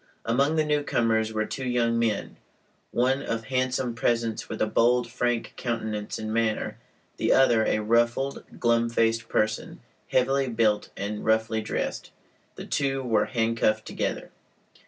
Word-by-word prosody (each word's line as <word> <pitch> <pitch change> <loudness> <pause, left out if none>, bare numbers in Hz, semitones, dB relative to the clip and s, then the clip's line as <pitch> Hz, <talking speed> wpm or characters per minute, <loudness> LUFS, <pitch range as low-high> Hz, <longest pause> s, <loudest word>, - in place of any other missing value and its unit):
Among 140 +7 +2
the 155 -1 +2
newcomers 115 -7 +1
were 110 0 -1
two 130 +3 -5
young 115 -1 +1
men, 110 -3 -1 0.5
one 130 +3 +1
of 115 0 -3
handsome 130 0 -1
presence 115 -1 -1
with - - -5
a - - +3
bold, 120 +3 +2
frank 120 -1 -1
countenance 110 -3 -3
and 110 0 -4
manner; 115 -1 -1 0.4
the - - +1
other 120 -4 +5
a - - +2
ruffled, 120 +5 +1 0.2
glum 115 -1 +2
faced 115 0 +1
person, 110 0 -1 0.3
heavily 135 +1 +2
built 110 -3 +1
and 105 +1 -4
roughly 110 0 +1
dressed. 110 - -3 0.5
The - - -8
two 135 -1 -1
were 110 -4 +2
handcuffed 115 -2 0
together. - - -3
115 Hz, 140 wpm, -26 LUFS, 110-125 Hz, 0.5 s, other